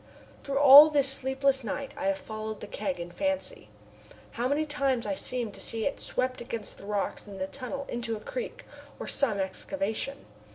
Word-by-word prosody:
Through 275 Hz, -1 st, -2 dB
all 285 Hz, +2 st, +10 dB
this 285 Hz, -2 st, +3 dB
sleepless 270 Hz, 0 st, +1 dB
night 270 Hz, +6 st, -4 dB
I 290 Hz, -, -3 dB
have 290 Hz, 0 st, +1 dB
followed 215 Hz, -3 st, -6 dB
the -, -, -7 dB
keg 195 Hz, -3 st, -4 dB
in 170 Hz, 0 st, -6 dB
fancy. 285 Hz, -, -3 dB, 0.6 s
How 240 Hz, +2 st, -1 dB
many 290 Hz, +3 st, +1 dB
times 275 Hz, -5 st, 0 dB
I -, -, -1 dB
seem 250 Hz, -5 st, -2 dB
to -, -, -8 dB
see 225 Hz, -1 st, -2 dB
it 280 Hz, -, -2 dB
swept 255 Hz, 0 st, -2 dB
against 230 Hz, -3 st, -6 dB
the -, -, -11 dB
rocks 205 Hz, 0 st, -2 dB
in 200 Hz, -1 st, -9 dB
the 190 Hz, -, -2 dB
tunnel 275 Hz, +5 st, -6 dB
into 235 Hz, -2 st, -3 dB
a -, -, -9 dB
creek, -, -, -6 dB, 0.3 s
or -, -, -5 dB
some 240 Hz, -8 st, +3 dB
excavation. 275 Hz, +7 st, -3 dB
260 Hz, 190 wpm, -28 LUFS, 215-285 Hz, 0.6 s, all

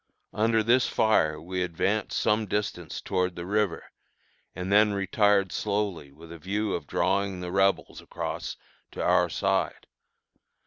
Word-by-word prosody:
Under 110 Hz, +1 st, +2 dB
this 120 Hz, +3 st, +3 dB
fire 80 Hz, -9 st, +2 dB
we 90 Hz, +3 st, -4 dB
advanced 95 Hz, +4 st, -1 dB
some 105 Hz, 0 st, +1 dB
distance 95 Hz, -5 st, -3 dB
toward 90 Hz, -2 st, -1 dB
the 85 Hz, -, -6 dB
river, 100 Hz, -3 st, -1 dB, 0.6 s
and 90 Hz, +2 st, -4 dB
then 105 Hz, +1 st, +5 dB
retired 100 Hz, 0 st, +2 dB
slowly 100 Hz, -8 st, -2 dB
with 80 Hz, +4 st, -14 dB
a 85 Hz, -, -9 dB
view 100 Hz, +5 st, -2 dB
of 80 Hz, -4 st, -4 dB
drawing 100 Hz, -1 st, 0 dB
the 90 Hz, -1 st, -5 dB
Rebels 95 Hz, +1 st, +1 dB
across -, -, -5 dB, 0.4 s
to -, -, -4 dB
our -, -, +3 dB
side. -, -, -1 dB
95 Hz, 140 wpm, -27 LUFS, 90-105 Hz, 0.6 s, then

